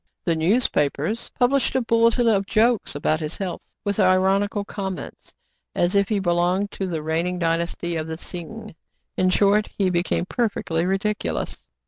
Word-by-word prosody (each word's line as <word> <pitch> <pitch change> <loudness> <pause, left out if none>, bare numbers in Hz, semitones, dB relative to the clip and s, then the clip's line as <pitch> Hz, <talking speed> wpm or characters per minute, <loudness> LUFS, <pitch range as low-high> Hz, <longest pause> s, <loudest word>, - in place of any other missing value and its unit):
The 170 - +1
newspapers 160 - +1
published 265 +1 +2
a 260 - +3
bulletin 230 +1 +3
of 200 -3 +2
jokes 230 -3 +2
about 155 +2 0
his 155 0 -4
health 190 -3 -5 0.2
with 205 0 -1
ironical 195 +2 +2
comments, 195 -3 -6 0.4
as 175 +3 +1
if 200 -1 +3
he 215 - +1
belonged 180 +2 +1
to 190 - -3
the 160 -4 -3
reigning 165 +3 -1
dynasty 170 0 -1
of 155 0 -3
the 160 0 -5
Tsing. 190 +6 -8 0.4
In 185 - +2
short, 205 +3 +3
he 190 -2 +2
became 175 0 0
perfectly 185 -6 -1
ridiculous. 205 +2 -2
190 Hz, 150 wpm, -23 LUFS, 170-210 Hz, 0.4 s, a